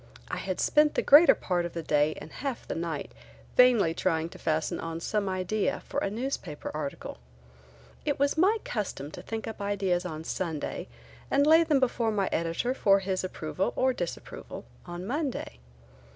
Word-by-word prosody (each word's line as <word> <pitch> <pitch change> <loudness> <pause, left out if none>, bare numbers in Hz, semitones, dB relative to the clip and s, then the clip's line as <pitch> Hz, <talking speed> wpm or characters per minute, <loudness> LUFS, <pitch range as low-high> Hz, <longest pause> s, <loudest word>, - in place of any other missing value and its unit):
I - - -2
had 185 -1 -3
spent 300 0 +3
a - - +2
greater 305 +4 +8
part 180 -2 -1
of 170 - -5
the 165 - -4
day 150 0 +2
and 160 - -10
half 275 -4 -5
the - - -2
night 165 -3 -4 0.4
vainly 240 -10 +5
trying 165 -2 0
to - - -13
fasten 160 +2 -1
on 165 0 -4
some 200 +2 -1
idea 185 +3 -1
for - - -2
a - - -1
newspaper 215 - -4
article. 145 - -5 0.8
It - - 0
was 280 +1 +2
my 385 +7 +4
custom 190 - -4
to - - -8
think 225 0 -5
up 220 -2 -6
ideas 195 -3 0
on 160 -3 -5
Sunday 160 -3 -3 0.4
and 280 +1 +3
lay 320 +2 +7
them 305 -4 +3
before 240 -3 +1
my 205 -3 0
editor 170 +10 0
for 200 -6 +4
his 190 -1 -2
approval 185 0 -2
or 260 0 +2
disapproval 175 - -6 0.2
on 175 +1 -6
Monday. 265 - -3
190 Hz, 175 wpm, -28 LUFS, 165-250 Hz, 0.8 s, greater